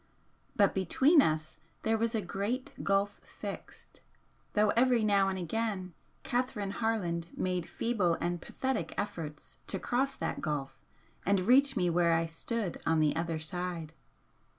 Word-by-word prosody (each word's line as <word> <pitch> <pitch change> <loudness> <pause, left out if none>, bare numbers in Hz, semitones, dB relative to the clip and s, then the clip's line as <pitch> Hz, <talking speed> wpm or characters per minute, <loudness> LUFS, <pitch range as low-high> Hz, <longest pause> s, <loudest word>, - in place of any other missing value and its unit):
But 200 -2 +4
between 265 - +5
us 155 - -1 0.3
there 225 0 +2
was 230 +1 0
'a 215 - 0
great 205 +8 -2
gulf 200 +1 +1
fixed,' - - -9 0.5
though 210 -1 +4
every 245 -1 +3
now 200 -2 +4
and 190 - -2
again 185 0 -2 0.3
Catherine 240 -6 -1
Harland 185 -7 -1
made 180 -2 -1
feeble 205 -8 +1
and 175 0 -2
pathetic 265 0 -2
efforts 160 -7 -5
to - - 0
cross 270 +3 0
that - - -3
gulf 135 -3 -3 0.4
and 200 0 +2
reach 265 +6 +5
me 180 - +2
where 170 0 +3
I 165 0 +2
stood 185 +4 -3
on 165 -1 +2
the 155 -1 +3
other 165 0 -1
side. 165 0 -3
195 Hz, 145 wpm, -31 LUFS, 170-230 Hz, 0.5 s, between